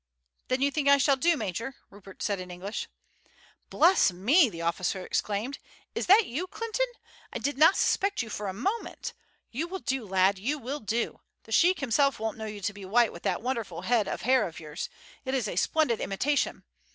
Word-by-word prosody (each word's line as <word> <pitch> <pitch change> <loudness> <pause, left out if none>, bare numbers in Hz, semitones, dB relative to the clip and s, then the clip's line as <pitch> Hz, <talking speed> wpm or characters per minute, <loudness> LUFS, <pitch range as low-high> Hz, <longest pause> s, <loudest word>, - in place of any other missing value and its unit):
"Then 255 +1 +1
you 280 - +3
think 285 -1 -1
I 280 - +7
shall 275 0 +4
do, 335 +5 +2
major?" 225 +4 -4 0.2
Rupert 195 -1 -11
said 200 -2 0
in 180 0 -7
English. 185 +4 -5 0.8
"Bless 345 - +5
me!" 245 - +4
the 170 -4 -7
officer 180 +2 -1
exclaimed; 215 +7 -2 0.3
"is - - -3
it 415 +3 +7
you, 315 +10 -3
Clinton? 460 +5 -2 0.4
I - - -3
did 285 - -2
not 315 +7 +6
suspect 395 -8 +1
you - - -8
for 205 0 -4
a - - -1
moment. 390 - -3 0.4
You 300 +8 -2
will 380 +2 -4
do, 270 -7 -2
lad, 190 +1 +3
you 275 +10 -1
will 275 +2 -5
do. 225 +1 -2 0.2
The 225 - -15
sheik 355 +9 +4
himself 275 +1 +2
won't 220 -1 -2
know 220 - -4
you 210 -1 -7
to 205 +2 -2
be 200 0 -10
white 225 +4 +3
with 170 - -10
that - - -1
wonderful 230 -9 -3
head 225 0 +2
of - - -4
hair 260 +2 +3
of 165 - -9
yours. 155 +1 -6 0.3
It 260 0 -2
is 245 -5 0
a - - -4
splendid 245 - +2
imitation. 275 +9 0
235 Hz, 200 wpm, -28 LUFS, 195-285 Hz, 0.8 s, I